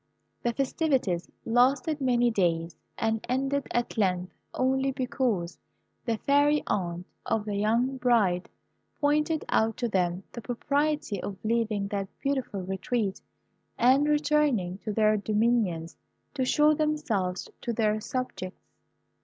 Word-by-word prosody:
The 240 - +1
festivities 255 - 0 0.2
lasted 275 +6 +2
many 245 -2 +3
days, 170 -5 0 0.2
and 225 -1 0
ended 270 +2 0
at 240 -1 -1
length 180 -3 0 0.2
only 265 +1 +1
because 250 -9 -1 0.5
the 230 -2 0
fairy 290 +4 +3
aunt 175 -2 -2 0.2
of 220 -2 -1
the 205 -1 -3
young 230 +6 +1
bride 220 -8 +2 0.5
pointed 300 +1 +1
out 220 0 +2
to 240 - 0
them 180 -3 0
the 235 - -7
propriety 280 -2 -1
of 195 - -5
leaving 220 -3 0
that 200 -1 -2
beautiful 265 -8 -2
retreat, 190 +2 -2 0.6
and 265 +4 +4
returning 295 -11 +2
to 215 - -4
their 215 0 +3
dominions, 210 -6 0 0.4
to 265 -3 0
show 300 +3 +4
themselves 290 -13 -1
to 235 - -2
their 215 -1 +1
subjects. 235 -7 -5
230 Hz, 125 wpm, -28 LUFS, 200-270 Hz, 0.6 s, and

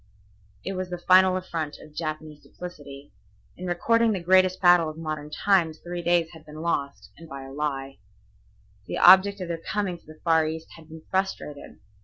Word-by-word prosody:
It 195 - -3
was 185 -1 -4
the 180 - -4
final 185 +1 +5
affront 165 -5 -4
of 155 - -15
Japanese 155 -1 -5
duplicity. 145 -5 -11 0.4
In 180 - -7
recording 230 +6 +2
the 195 - -2
greatest 185 +1 +3
battle 175 -3 +5
of 155 - -9
modern 155 -2 -5
times 165 -1 +1
three 175 0 -6
days 170 -1 +1
had 160 -2 -14
been 155 0 -11
lost, 140 -4 -3
and 165 -1 -13
by 135 -2 -8
a 135 - -10
lie. 135 -2 -4 0.9
The - - -4
object 190 +2 +6
of 180 - -4
their 165 -1 -4
coming 190 -2 -3
to - - -30
the 155 0 -14
Far 160 -2 +3
East 160 +1 -6
had 160 -1 -16
been 160 0 -11
frustrated. 190 -6 -3
165 Hz, 185 wpm, -25 LUFS, 155-185 Hz, 0.9 s, object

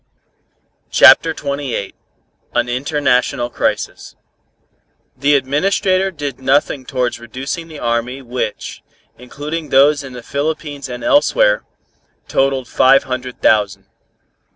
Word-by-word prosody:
CHAPTER - - +7
XXVIII 140 -8 -4 0.6
AN - - +1
INTERNATIONAL 125 -1 0
CRISIS - - -3 1.0
The 140 +3 +2
Administrator 185 - +1
did 145 -7 -6
nothing 135 0 0
towards 125 -1 -2
reducing 130 +8 -6
the 160 -2 -10
army 120 +1 -2
which, 120 -3 -5 0.4
including 150 +5 -6
those 145 +2 +4
in 135 -2 -9
the 120 -1 -9
Philippines 145 0 -4
and 125 0 -7
elsewhere, - - +3 0.6
totalled 135 -2 0
five 135 +3 +4
hundred 125 -1 -6
thousand. 105 -3 +2
135 Hz, 105 wpm, -17 LUFS, 125-150 Hz, 1.0 s, CHAPTER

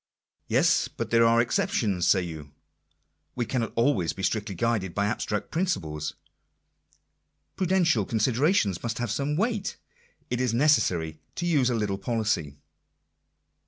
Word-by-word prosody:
Yes, - - +3
but - - -6
there 115 0 +5
are 115 0 +4
exceptions, 105 -5 +1
say 95 -2 +4
you. 80 -4 -7 0.9
We 120 - -1
cannot 115 -1 -2
always 110 - +2
be 95 - -7
strictly 105 -1 -1
guided 100 -3 -1
by 100 - +1
abstract 105 -1 -2
principles. 80 - -2 1.4
Prudential 175 - +2
con 115 - -1
siderations 115 - +2
must 115 -1 -3
have 120 -3 -2
some 140 +6 -1
weight. 215 0 -1 0.5
It 125 0 0
is 125 -3 0
necessary 90 - +2 0.2
to 175 - -3
use 145 -7 +3
a 120 - 0
little 105 -3 -1
policy. 100 - -1
115 Hz, 135 wpm, -26 LUFS, 95-130 Hz, 1.4 s, there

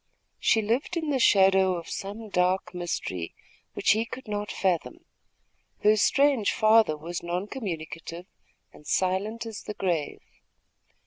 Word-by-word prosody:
She 220 - +3
lived 245 +11 -1
in 320 -3 -1
the 270 - +1
shadow 190 -4 +5
of 170 -1 -7
some 210 +3 -6
dark 180 -1 +1
mystery, 130 - -4 0.4
which - - +2
he 220 +2 +2
could 255 +2 -9
not 205 0 -3
fathom. 195 - -1 0.8
Her 215 +1 +6
strange 270 +1 +3
father 215 -7 +4
was 170 +3 -5
non 175 +3 -3
communicative 170 -6 -6 0.5
and 150 - -16
silent 200 +5 0
as 225 -3 -7
the 210 - -7
grave. 170 -6 -2
195 Hz, 135 wpm, -27 LUFS, 175-225 Hz, 0.8 s, Her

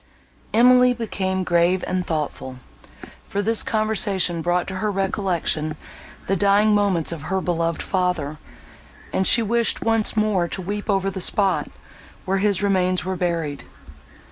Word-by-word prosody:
Emily 250 +2 +5
became 190 -5 -2
grave 175 +1 +2
and 185 0 -1
thoughtful; 150 -5 -4 0.7
for 200 +1 -3
this 225 +1 +1
conversation 205 -5 0
brought 175 +2 0
to 190 - -5
her 210 +3 -1
recollection 185 -6 -1 0.5
the 195 - 0
dying 205 +3 +3
moments 195 -6 +1
of 165 -3 -6
her 190 0 0
beloved 170 -3 -1
father, 180 -6 -2 0.7
and 190 - +1
she 230 - +5
wished 235 +2 +1
once 225 -1 +1
more 210 -5 +1
to 190 - -5
weep 205 +3 -5
over 195 -1 +1
the 190 -1 -5
spot, 195 +1 +1 0.6
where 195 +1 0
his 205 -1 +1
remains 185 -2 +1
were 190 0 -2
buried. 165 -5 -2
190 Hz, 140 wpm, -22 LUFS, 175-205 Hz, 0.7 s, Emily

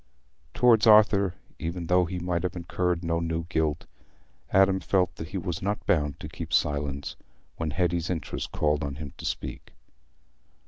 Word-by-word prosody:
Towards 115 -2 +5
Arthur, 105 -4 +6 0.2
even 85 +2 -4
though 90 +1 +3
he 90 +2 -4
might 90 -1 -1
have 90 - -3
incurred 90 0 -1
no 85 0 0
new 85 0 -2
guilt, 80 -4 0 0.6
Adam 95 0 +4
felt 90 -4 +1
that 80 - -6
he 95 - -5
was 90 -3 -3
not 100 +2 -2
bound 75 -4 +1
to - - -6
keep - - -7
silence 70 -1 0 0.4
when 80 -1 -2
Hetty's 85 +2 0
interest 85 -5 -4
called 75 0 +1
on 70 -1 -3
him 70 -2 -8
to - - -8
speak. - - -5
85 Hz, 165 wpm, -27 LUFS, 80-95 Hz, 0.6 s, Arthur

